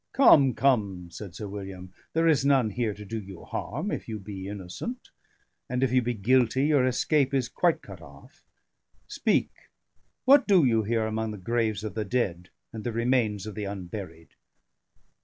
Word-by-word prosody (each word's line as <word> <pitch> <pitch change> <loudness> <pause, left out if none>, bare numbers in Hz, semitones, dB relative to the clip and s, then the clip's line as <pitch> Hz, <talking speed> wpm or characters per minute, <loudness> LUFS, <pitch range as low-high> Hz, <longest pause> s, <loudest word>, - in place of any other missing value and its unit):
"Come, 145 - +6
come!" 100 -10 +1
said 95 -2 -9
Sir 105 0 -6
William. 95 -2 -8 0.2
"There 165 +1 +2
is 155 -4 +3
none 135 -6 +3
here 110 -1 -2
to 105 - -10
do 110 +3 -4
you 95 -3 -11
harm, 160 - -4
if - - -5
you 110 - -3
be 95 -1 -7
innocent; 100 - -7 0.6
and 125 +1 0
if 130 - +2
you 130 0 +4
be 120 0 -2
guilty, 125 +4 +2
your 145 -4 +3
escape 140 +2 +1
is 130 -3 +1
quite 170 +6 +1
cut - - -11
off. - - -16 0.6
Speak, - - +1 0.7
what 275 +1 +6
do 185 -7 +5
you 115 -3 +3
here 110 +1 0
among 110 0 -2
the 105 - -6
graves 110 +1 -1
of 110 -3 -4
the 110 - -2
dead 95 -6 -2 0.2
and 110 -1 -6
the 120 - -2
remains 115 -4 0
of 110 - -6
the 105 -1 -4
unburied?" 90 -4 -7
110 Hz, 175 wpm, -27 LUFS, 100-130 Hz, 0.7 s, Come